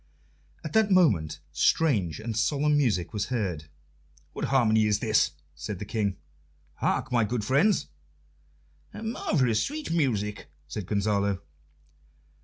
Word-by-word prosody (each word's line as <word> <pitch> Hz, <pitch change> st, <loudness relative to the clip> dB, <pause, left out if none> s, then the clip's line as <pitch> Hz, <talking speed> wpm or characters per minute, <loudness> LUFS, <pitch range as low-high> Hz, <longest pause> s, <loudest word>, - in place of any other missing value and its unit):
At 155 Hz, -, -6 dB
that 220 Hz, -2 st, +4 dB
moment 90 Hz, -, +3 dB
strange 90 Hz, -, +2 dB
and 115 Hz, 0 st, -4 dB
solemn 145 Hz, +6 st, +2 dB
music 110 Hz, -11 st, +1 dB
was 105 Hz, -1 st, -2 dB
heard. 95 Hz, -11 st, -2 dB, 0.7 s
"What -, -, -3 dB
harmony 110 Hz, -5 st, +3 dB
is 105 Hz, -1 st, +2 dB
this?" 110 Hz, 0 st, +2 dB, 0.2 s
said 75 Hz, +7 st, -6 dB
the 105 Hz, -, -6 dB
King. 100 Hz, -3 st, -1 dB, 0.6 s
"Hark, 130 Hz, -, -1 dB
my 120 Hz, -2 st, +3 dB
good 110 Hz, 0 st, -2 dB
friends!" 150 Hz, -, +3 dB, 1.1 s
"Marvellous 145 Hz, -, 0 dB
sweet 300 Hz, -, -4 dB
music!" 105 Hz, -11 st, -1 dB, 0.2 s
said 90 Hz, +5 st, -6 dB
Gonzalo. 100 Hz, -2 st, 0 dB
110 Hz, 120 wpm, -27 LUFS, 100-140 Hz, 1.1 s, that